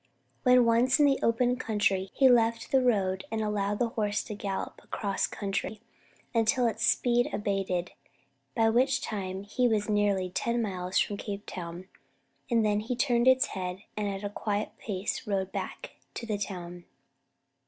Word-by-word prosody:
When 250 -2 +5
once 235 +3 +3
in 295 - +6
the 275 -1 +3
open 245 +2 +2
country, 205 -5 0
he 270 - +6
left 230 -2 +3
the 265 - +5
road, 195 -6 +1
and 225 - -1
allowed 205 -1 -1
the 235 +1 +1
horse 210 -2 -1
to - - -6
gallop 200 -2 -4
across 200 -3 -1
country 200 +1 -3 0.5
until 230 +2 +3
its 230 - -1
speed 245 0 +3
abated, 195 -4 -1 0.6
by 225 0 +3
which 260 +3 +2
time 190 -2 -4
he 245 +5 +1
was 215 -3 +1
nearly 200 -3 +1
ten 235 +5 -1
miles 185 -4 -2
from 205 - +1
Cape 205 0 -6
Town; 175 0 -7 0.6
then 215 -3 +2
he 225 +4 -3
turned 245 -1 +2
its 260 +2 +5
head, 185 0 -4
and 210 -1 -1
at 195 0 -4
a 205 - -2
quiet 205 0 -2
pace 200 0 -3
rode 195 -2 -1
back - - -5 0.2
to 235 - -5
the 210 -3 -2
town. 175 -3 -6
210 Hz, 165 wpm, -29 LUFS, 195-235 Hz, 0.6 s, in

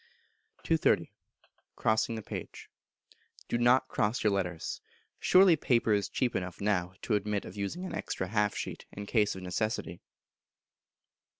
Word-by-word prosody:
230. 165 -1 +2 0.6
Crossing 110 +1 +1
the 110 - -6
Page. - - -8 0.8
Do 120 - 0
not 120 +2 +4
cross 105 +4 0
your 105 -2 +3
letters: 90 -4 -3 0.4
surely 185 -2 +6
paper 120 -7 +2
is 100 -1 +1
cheap 125 -2 -1
enough 90 -1 -3
now 95 -3 0
to 115 - -1
admit 105 0 0
of 90 - -9
using 105 - -3
an - - -6
extra 95 - -3
half 105 -1 +1
sheet, - - -5
in 100 - -7
case 105 -2 +2
of 95 - -8
necessity. 90 -2 -2
105 Hz, 140 wpm, -30 LUFS, 100-120 Hz, 0.8 s, surely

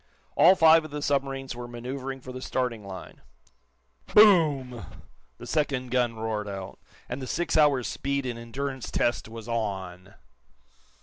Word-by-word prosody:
All 185 +3 +7
five 165 -2 +6
of 155 - -8
the 145 0 -5
submarines 135 -2 -1
were 120 0 -7
manoeuvering 130 +3 -6
for 130 - -9
the 130 0 -7
starting 125 -5 -2
line. 95 -2 -10 0.9
Boom! 150 - +5 0.5
The 120 - -10
second 135 -2 -1
gun 120 -2 +1
roared 110 -2 -3
out, 95 -1 -7 0.3
and 125 +3 -5
the 130 - -5
six 175 +5 -1
hours' 145 -5 +4
speed 140 0 -2
and 120 -2 -4
endurance 130 +2 -5
test 120 -2 0
was 115 0 -9
on! 95 -5 -4
130 Hz, 145 wpm, -27 LUFS, 115-140 Hz, 0.9 s, All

